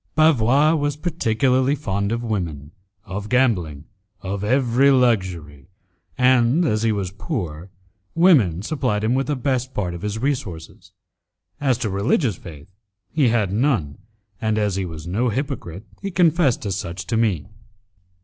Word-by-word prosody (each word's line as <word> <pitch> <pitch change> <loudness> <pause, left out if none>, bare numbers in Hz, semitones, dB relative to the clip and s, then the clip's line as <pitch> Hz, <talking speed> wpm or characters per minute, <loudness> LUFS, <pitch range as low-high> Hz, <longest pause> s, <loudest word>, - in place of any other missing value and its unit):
Bavois 150 -1 +4
was 145 -2 0
particularly 130 -4 +1
fond 100 -7 -2
of 115 +1 -2
women, 85 -10 -4 0.3
of 100 +3 -6
gambling, 90 - +1 0.4
of 100 +1 -4
every 130 +3 +3
luxury, 95 - 0 0.5
and, 125 +5 +3
as 110 -7 +1
he 115 -1 +2
was 100 -4 -2
poor, 95 - -5 0.5
women 130 - +4
supplied 125 -6 -1
him 110 +3 +1
with 135 +1 0
the 150 - 0
best 130 0 -2
part 90 -4 -2
of 85 - -7
his 105 +1 -3
resources. 110 - -4 0.7
As 135 -4 +1
to 115 -4 -2
religious 105 - +1
faith 80 +4 -12 0.4
he 150 -5 +2
had 110 -5 +1
none, 105 - 0 0.4
and 110 -1 0
as 105 -3 0
he 95 -1 -2
was 80 -2 -8
no 110 +8 0
hypocrite 115 - -4 0.2
he 200 - -3
confessed 170 - +2
as 95 -1 -2
much 85 +1 -6
to 115 - -2
me. 110 -9 +1
110 Hz, 150 wpm, -22 LUFS, 95-135 Hz, 0.7 s, Bavois